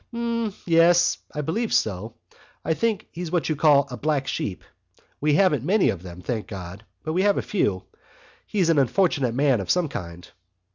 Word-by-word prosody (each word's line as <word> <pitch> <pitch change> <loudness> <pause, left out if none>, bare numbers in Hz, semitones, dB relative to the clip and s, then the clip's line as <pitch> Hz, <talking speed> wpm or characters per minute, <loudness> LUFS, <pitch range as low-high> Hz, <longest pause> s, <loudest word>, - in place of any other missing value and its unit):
"Mmmyes, 200 -8 +2
I 150 - -3
believe 215 +10 -2
so.... 110 +2 -1 0.5
I 160 - +2
think 220 +2 -1
he's 175 0 -6
what 175 -1 -1
you 155 - +1
call 145 -2 +4
a 125 - -5
black 150 -2 0
sheep. 95 -7 -3 0.6
We 150 0 +2
haven't 150 - +3
many 190 +7 +3
of 90 - -7
them, 90 -1 -10
thank 115 -4 -3
God! 95 0 -8 0.2
but 155 - -3
we 180 - +1
have 205 0 +3
a - - -1
few.... 100 - -1 0.6
He's 185 -5 +1
an 160 -3 +4
unfortunate 140 -3 +1
man 135 -5 +2
of 95 - -7
some 180 -4 +2
kind...." 85 -6 -7
150 Hz, 180 wpm, -24 LUFS, 115-180 Hz, 0.6 s, call